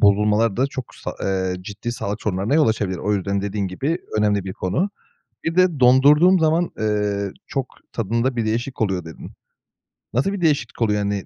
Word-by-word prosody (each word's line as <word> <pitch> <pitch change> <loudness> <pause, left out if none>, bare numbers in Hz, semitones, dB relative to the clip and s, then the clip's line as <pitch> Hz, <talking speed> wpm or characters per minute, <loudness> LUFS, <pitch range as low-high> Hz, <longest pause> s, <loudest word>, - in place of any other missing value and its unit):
bozulmalar 105 +1 +3
da 130 +3 +2
çok 130 -2 -7
sa - - -6
eee, 95 -1 0
ciddi 105 +5 -5
sağlık 110 -2 -4
sorunlarına 100 +5 0
yol 155 -4 +4
açabilir. 100 -4 -1
O 105 +4 0
yüzden 100 0 -1
dediğin 100 0 -2
gibi 140 - -2 0.2
önemli 105 -2 +2
bir 95 - -4
konu. 100 - -1 0.5
Bir 165 - -2
de 185 -5 +3
dondurduğum 145 +9 +6
zaman, 160 +2 +2
eee, 105 -2 0 0.2
"Çok 135 -3 -2 0.2
tadında 115 +4 -1
bir 115 -2 -1
değişik 120 +4 -2
oluyor." 95 -5 0
dedin. 80 -1 -10 0.8
Nasıl 140 - +1
bir 200 - -4
değişiklik 145 -9 0
oluyor? 105 -2 +2
Hani, 100 -1 -2
110 Hz, 175 wpm, -22 LUFS, 100-135 Hz, 0.8 s, dondurduğum